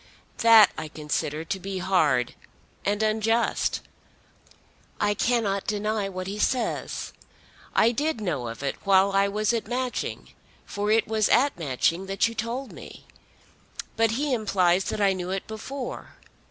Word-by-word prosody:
That 225 -2 +7
I 155 - -5
consider 150 +1 -3
to 190 +3 -3
be 195 +1 -5
hard, 155 -10 +2 0.5
and 205 +2 0
unjust. 220 +2 +1 1.2
I 205 0 +2
cannot 205 -4 0
deny 210 -1 -1
what 185 -1 -5
he 200 +2 -5
says. 245 +1 -1 0.6
I 230 - +5
did 295 +2 -1
know 150 - -2
of 115 +4 -7
it 140 - -2
while 195 0 +4
I 195 0 +3
was 210 +3 0
at 230 -3 -2
Matching, 250 +1 -3 0.4
for 205 +1 -3
it 220 +1 +3
was 215 -1 +1
at 275 +4 +3
Matching 165 +5 0
that 195 +3 +1
you 230 - -6
told 235 +4 -4
me. - - -12 0.9
But 225 0 +3
he 290 -1 0
implies 195 -5 +2
that 210 - -3
I 195 -1 +4
knew 180 -1 -5
it 190 0 -3
before. 245 +4 -7
205 Hz, 150 wpm, -26 LUFS, 190-225 Hz, 1.2 s, That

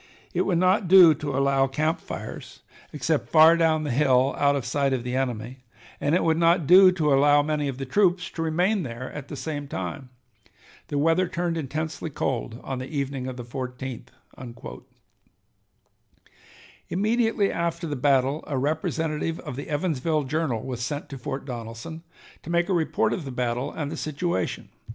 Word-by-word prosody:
It - - 0
would 180 -4 +2
not 185 +2 +2
do 180 -3 +8
to 145 -2 -4
allow 135 0 +3
camp 155 +4 -1
fires - - -8 0.3
except 150 +1 -1
far 160 +1 +7
down 160 -2 +2
the 150 - -2
hill 130 0 +3
out 140 0 +2
of 135 -4 -3
sight 135 +1 0
of 125 -2 -2
the 125 +1 -3
enemy, 125 -1 -3 0.4
and 145 +3 +1
it - - +2
would 160 -1 +2
not 170 -1 +3
do 185 +4 +8
to 155 -5 +1
allow 145 +1 +5
many 150 -1 -1
of 135 -2 -4
the 135 - -4
troops 180 +4 +1
to 165 - -5
remain 180 +6 +1
there 125 -3 -6
at 145 -2 -7
the - - -7
same 145 +1 -5
time. 95 +3 -5 0.8
The 145 - -3
weather 165 +5 +2
turned 170 -1 -2
intensely 155 +2 -4
cold 120 -4 -3
on 135 -1 -4
the 130 - -6
evening 140 -3 -3
of 130 -1 -6
the 120 - -6
14th." 125 0 -6 2.8
Immediately 215 +1 +1
after 170 0 -2
the 150 -3 -3
battle 135 +1 +2
a 140 - -2
representative 155 +3 -1
of - - -7
the 140 - -7
"Evansville 155 -1 0
Journal" 135 -5 -2
was 125 -2 -5
sent 145 +3 -4
to 135 - -7
Fort 135 +2 -5
Donelson 120 +6 -7 0.4
to - - -10
make 170 +1 +1
a - - +2
report 165 -3 +1
of 180 - -4
the 135 - -6
battle 125 +2 -2
and 145 -2 -4
the - - -5
situation. 155 - -3
145 Hz, 175 wpm, -25 LUFS, 130-165 Hz, 2.8 s, do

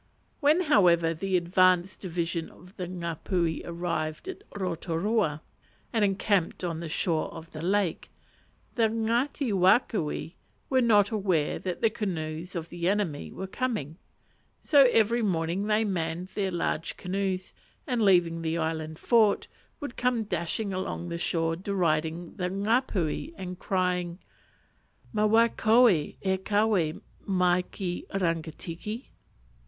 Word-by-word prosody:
When, 305 +4 +4
however, 175 - +4
the 185 +3 0
advanced 185 +1 +2
division 170 -2 -2
of 180 +2 -17
the 180 -2 -4
Ngapuhi 170 -1 -2
arrived 170 - -3
at 380 +1 -6
Rotorua, 175 -2 -1 0.5
and 225 -2 +2
encamped 195 -3 +1
on 165 -2 -2
the 170 -1 -5
shore 160 0 0
of 165 0 -10
the 155 - -7
lake, 190 0 0 0.6
the 225 -2 +3
Ngati 230 +3 0
Wakawe 190 - +2 0.4
were 260 -1 +4
not 210 -3 +4
aware 185 -10 0
that 180 0 -4
the 225 - +3
canoes 175 -4 -4
of 170 -1 -4
the 175 +1 -1
enemy 195 -8 -1
were 190 - -5
coming, 190 - -3 0.6
so 285 -3 +6
every 230 +2 +3
morning 180 0 0
they 215 +1 +3
manned 175 -2 -2
their 195 -1 -1
large 170 -2 -2
canoes, 190 0 -2 0.3
and 250 -6 -1
leaving 175 -5 +4
the 165 0 -1
island 160 -1 -2
fort, 220 -1 +3 0.3
would 285 -5 -6
come 245 -2 +1
dashing 195 +2 -2
along 185 -2 -3
the 170 0 -4
shore 165 -1 0
deriding 170 -2 -1
the 180 -2 -1
Ngapuhi, 210 - 0
and 180 -1 -6
crying, 180 -2 -1 1.0
"_Ma 215 0 +2
wai 230 +2 +5
koe 230 +3 +5
e 155 -7 0 0.3
kawe 205 -7 +1 0.3
mai 180 -2 +3
ki 180 -3 -4
Rangitiki? 170 - -3
185 Hz, 130 wpm, -28 LUFS, 165-210 Hz, 1.0 s, so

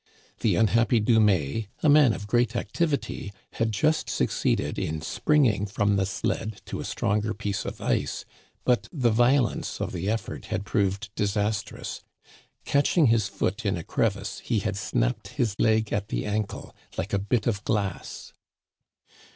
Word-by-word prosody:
The 105 -6 +2
unhappy 115 +4 +3
Dumais, 105 - +2 0.2
a - - +4
man 145 -4 +7
of 105 - -5
great 120 +2 +1
activity, 140 -6 -2 0.2
had 115 -1 0
just 155 +9 +1
succeeded - - 0
in 80 0 -2
springing 115 - +2
from 100 0 +1
the 95 -1 +1
sled 105 +2 -2
to - - -5
a - - -4
stronger 105 +2 0
piece 100 -1 -3
of - - -5
ice, - - -1 0.4
but 125 -1 +2
the 125 -7 +2
violence 120 +3 +2
of - - -2
the 90 +3 -2
effort 115 +1 -3
had 100 - -3
proved 100 -1 0
disastrous; 105 0 -2 0.6
catching 145 +3 +3
his 110 -4 +2
foot 100 +2 -2
in 100 -3 0
a 85 - -5
crevice, - - -1
he 115 - -1
had 100 -1 -1
snapped - - -1
his 110 -5 +1
leg 110 -1 +2
at 105 0 -1
the - - -2
ankle 105 -1 -3 0.2
like - - -3
a 100 - +3
bit 105 +4 0
of 105 -3 -1
glass. 100 -4 -3
105 Hz, 155 wpm, -26 LUFS, 100-115 Hz, 0.6 s, man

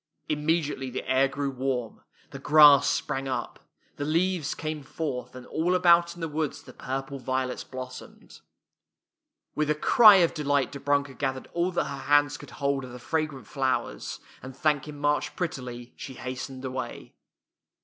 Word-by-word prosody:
Immediately 150 -3 0
the 125 - -5
air 130 +1 +4
grew 140 0 -3
warm, 130 -3 -3 0.3
the 140 - -8
grass 145 -1 +7
sprang 135 -2 -2
up, 130 - -4 0.4
the 145 - -3
leaves 165 +1 0
came 155 -1 -4
forth, 125 -4 -5
and 125 -1 -9
all 175 +3 0
about 170 -1 +4
in 175 - -11
the 165 - -1
woods 155 -1 -3
the - - -13
purple 135 +1 -5
violets 130 0 -2
blos 130 -1 -7
somed. - - -16 1.1
With 150 0 -1
a 150 - +3
cry 215 - +7
of 175 -3 +4
delight 145 -3 0
Dobrunka 140 0 0
gath 135 -2 0
ered 130 - -9
all 170 +1 +1
that - - +1
her 140 -1 -6
hands 145 -1 +4
could - - -12
hold 140 -1 0
of 125 -1 -9
the - - -7
fragrant 150 -1 -3
flowers, 130 +1 -2 0.2
and 130 0 -10
thanking 150 -1 0
March 145 0 0
pret 175 -3 -1
tily, 120 -2 -8
she 130 - -8
hastened 130 +1 -6
away. 130 0 -6
140 Hz, 170 wpm, -27 LUFS, 130-155 Hz, 1.1 s, grass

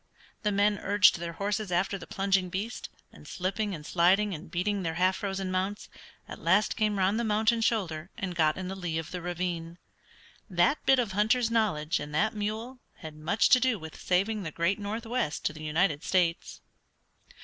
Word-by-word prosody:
The 210 - 0
men 205 +1 +2
urged 205 -4 +4
their 170 0 -5
horses 205 +2 -2
after 180 +3 +1
the 165 - -10
plunging 195 -1 +1
beast, 205 +7 -4 0.2
and - - -15
slipping 195 +2 -2
and 150 -2 -10
sliding 190 +5 +3
and 160 +3 -8
beating 200 +3 -1
their 165 -2 -2
half 185 +2 +2
frozen 195 -2 -3
mounts, 190 +3 -2 0.4
at - - -9
last 185 +5 +3
came 210 -2 +1
around 195 +3 +2
the 235 - 0
mountain 220 +1 +2
shoulder 180 -8 -1
and 185 -2 -3
got 155 -3 +2
in 185 -1 -4
the 190 - -4
lee 175 -4 -3
of 165 -1 -5
the 180 - -5
ravine. 175 -1 -4 0.7
That 185 - +2
bit 270 - +6
of 235 -5 0
hunter's 220 +4 +2
knowledge 180 -9 +1
and 150 0 -6
that 215 +7 +2
mule 220 +4 -4 0.2
had 155 -2 -9
much 155 +8 +2
to 255 - +7
do 255 -3 +1
with 160 -3 -9
saving 200 +4 +1
the 170 - -4
great 170 +6 0
northwest 220 -3 -3
to - - 0
the 155 - -10
United 155 0 +1
States. 175 -3 0
190 Hz, 190 wpm, -28 LUFS, 170-210 Hz, 0.7 s, to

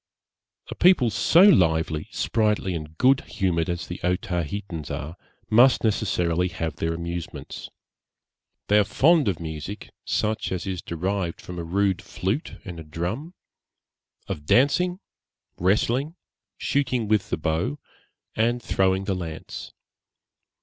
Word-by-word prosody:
A - - -2
people 175 -11 +4
so 165 - +5
lively, 80 - +4
sprightly, 105 - 0
and 80 -1 -6
good 135 +5 +4
humoured 85 -4 -1
as 85 0 -2
the 90 - -7
Otaheitans 90 -2 -2
are, 80 +4 -5 0.3
must 120 +4 +5
necessarily 90 -5 +1
have 80 -3 -4
their 80 0 -1
amusements. 85 0 -6 1.0
They 105 +1 +5
are - - +5
fond 150 - +3
of 95 -5 0
music, 80 +4 -6
such 110 0 -1
as 95 +1 -3
is 95 -3 -3
derived 90 +1 -2
from 90 -1 -8
a - - -3
rude 95 +2 +1
flute 105 - -3
and 90 -3 -7
a - - -7
drum; 90 - -4 0.9
of 75 0 -5
dancing, 180 - +3 0.6
wrestling, 120 - +1 0.4
shooting 130 -5 0
with 105 -2 +1
the - - -1
bow, 80 -1 -1 0.6
and 120 +2 +1
throwing 95 -4 +1
the 95 - -1
lance. 85 -4 -6
95 Hz, 130 wpm, -25 LUFS, 85-110 Hz, 1.0 s, so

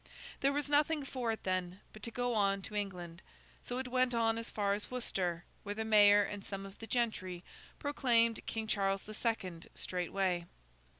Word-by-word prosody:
There 275 - +3
was 290 0 -1
nothing 295 0 +3
for 250 -4 -1
it 220 - -4
then, 185 0 -1
but 215 - -11
to 230 - -3
go 245 +1 -1
on 200 -2 +2
to 210 - -7
England; 180 -4 -4 0.4
so 245 - -4
it 260 0 -2
went 255 -1 +2
on 225 0 +2
as 230 - -5
far 200 -2 +1
as 205 +1 -4
Worcester, 185 -8 -2 0.2
where 205 0 -4
the 220 +1 -2
mayor 205 -1 +7
and 200 0 -5
some 195 -1 -5
of 195 0 -11
the 225 - -7
gentry 185 -8 -1 0.3
proclaimed 235 -6 +2
King 225 -1 -2
Charles 195 -2 +1
the 215 - -8
Second 190 -7 -2
straightway. 180 -1 -1
210 Hz, 185 wpm, -34 LUFS, 195-240 Hz, 0.4 s, mayor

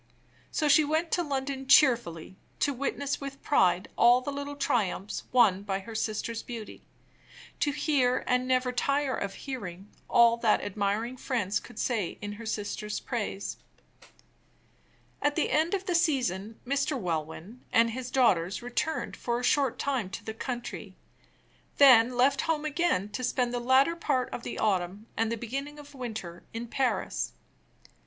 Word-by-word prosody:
So 305 - 0
she 310 +2 +6
went 315 +3 0
to 355 - +2
London 270 -3 -3
cheerfully, 235 - +4 0.2
to 285 - +1
witness 280 +2 -2
with 275 0 -7
pride 185 -8 +3
all 240 +1 +6
the 270 +3 -4
little 285 +1 -5
triumphs 205 -7 -1
won 225 -7 +4
by 200 -1 -2
her 225 +4 -9
sister's 225 +1 -2
beauty; 230 -3 -8 0.8
to 295 - +2
hear, 275 -4 +1
and 250 0 +1
never 255 0 +2
tire 275 +2 0
of 200 -1 -4
hearing, 200 -7 -7 0.2
all 235 0 +5
that 230 -2 +2
admiring 205 +5 -2
friends 220 -7 -1
could - - -14
say 225 -7 -1
in 205 0 -5
her 220 +2 -8
sister's 210 0 -3
praise. 210 -5 -4 1.6
At 290 0 +1
the 320 - 0
end 320 +5 +2
of 385 0 -4
the 360 - -1
season 245 - 0
Mr. 280 +2 0
Welwyn 170 +5 -4
and 230 0 +4
his 255 +1 -5
daughters 195 -6 +2
returned 300 +6 -2
for 240 0 -2
a - - -6
short 255 -1 +2
time 255 -9 -1
to 195 - -7
the 220 - -4
country; 240 +1 -6 0.8
then 250 -3 +7
left 270 +2 +4
home 315 -2 -1
again 300 - 0
to 255 - -5
spend 245 0 0
the 245 - -1
latter 260 +6 +4
part 275 -7 -1
of - - -4
the - - -6
autumn 195 0 0
and 225 0 0
the 230 - -1
beginning 275 +6 -5
of 290 -1 -12
the 280 - -15
winter 215 -9 -6
in 235 +1 -4
Paris. 210 - -1
245 Hz, 160 wpm, -28 LUFS, 210-275 Hz, 1.6 s, then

